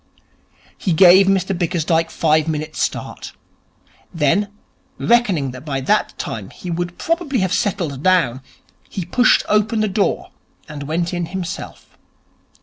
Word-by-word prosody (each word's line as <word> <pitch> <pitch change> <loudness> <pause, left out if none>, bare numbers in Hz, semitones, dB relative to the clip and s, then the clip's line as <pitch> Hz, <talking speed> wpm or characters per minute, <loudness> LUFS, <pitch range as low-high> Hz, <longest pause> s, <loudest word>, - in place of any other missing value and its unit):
He 180 - 0
gave 185 +3 +7
Mr 195 0 +1
Bickersdyke 165 -1 0
five 155 -1 +1
minutes' 155 0 -3
start. - - -4 0.8
Then, 165 +6 +1 0.5
reckoning 200 - +2
that 130 +1 -10
by 140 -3 -3
that 210 +11 0
time 105 -4 -5
he 180 - -8
would 175 +1 -3
probably 330 -5 -1
have 190 -1 0
settled 170 -10 -1
down, 160 -9 +2 0.5
he 185 - -5
pushed 245 +8 +3
open 215 +2 +1
the 215 - +1
door 200 0 -1 0.4
and 150 -2 -8
went 170 +3 -1
in 175 -1 -2
himself. 185 -2 -7
175 Hz, 135 wpm, -19 LUFS, 155-195 Hz, 0.8 s, gave